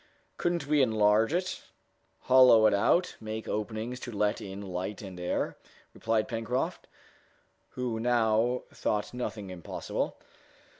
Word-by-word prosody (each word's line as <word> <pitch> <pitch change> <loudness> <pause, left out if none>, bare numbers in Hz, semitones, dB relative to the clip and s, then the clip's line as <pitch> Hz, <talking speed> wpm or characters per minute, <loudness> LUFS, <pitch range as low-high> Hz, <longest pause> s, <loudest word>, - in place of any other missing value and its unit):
"Couldn't 175 -4 0
we 150 0 +3
enlarge 110 -1 +3
it, 180 +2 -1 0.6
hollow 125 -4 +7
it 110 - +5
out, 170 - +2
make 110 0 -5
openings 110 +3 -3
to 120 - -7
let 105 0 0
in 95 0 -7
light 95 +2 -5
and 95 -2 -8
air?" 90 - -1 0.4
replied 110 -1 0
Pencroft, 120 +2 -2 0.9
who 120 -3 -2
now 120 +1 +2
thought 105 +1 -2
nothing 105 -5 -5
impossible. 90 -2 -4
110 Hz, 120 wpm, -29 LUFS, 105-125 Hz, 0.9 s, hollow